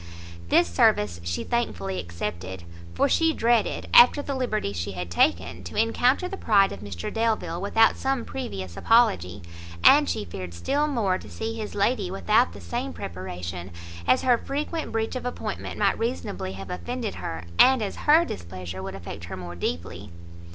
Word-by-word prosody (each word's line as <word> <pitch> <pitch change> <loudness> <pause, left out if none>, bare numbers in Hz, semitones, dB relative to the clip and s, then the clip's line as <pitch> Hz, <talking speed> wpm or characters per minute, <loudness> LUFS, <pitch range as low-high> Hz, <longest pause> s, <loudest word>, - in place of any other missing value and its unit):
This - - +4
service 85 +1 +2
she 85 0 -2
thankfully 95 - -2
accepted, 85 +1 -5 0.3
for - - +3
she 325 -1 +3
dreaded, 235 -3 +1
after 250 +4 +8
the 280 - -3
liberty 230 - -1
she 90 +2 -4
had 90 -1 -6
taken, 85 +1 +1
to - - -8
encounter 245 - +2
the 390 +1 -6
pride 200 - +4
of - - -7
Mr 95 -4 -6
Delvile 215 -7 -1
without 225 +3 +4
some 270 -2 -1
previous 95 - -6
apology, 95 - +2 0.4
and 290 +1 +7
she 215 - -2
feared 90 -3 -7
still 285 - 0
more 210 -10 0
to - - -12
see 225 0 -4
his 220 -2 -6
lady 205 -1 +1
without 215 +6 +2
the - - -11
same 255 +3 -4
preparation, 90 0 -6 0.4
as 125 - +4
her 245 -2 +4
frequent 300 +3 -3
breach 225 +2 -2
of 255 - -4
appointment 250 0 -5
might - - +2
reasonably 95 - -3
have 95 -1 -8
offended 90 -1 -4
her, 80 0 -5 0.2
and 260 -3 +6
as 200 - -4
her 320 +3 +7
displeasure 90 +1 -7
would 95 0 -6
affect 85 -2 -8
her 85 - -7
more 90 -1 -7
deeply. 85 +3 -4
170 Hz, 170 wpm, -25 LUFS, -, 0.4 s, after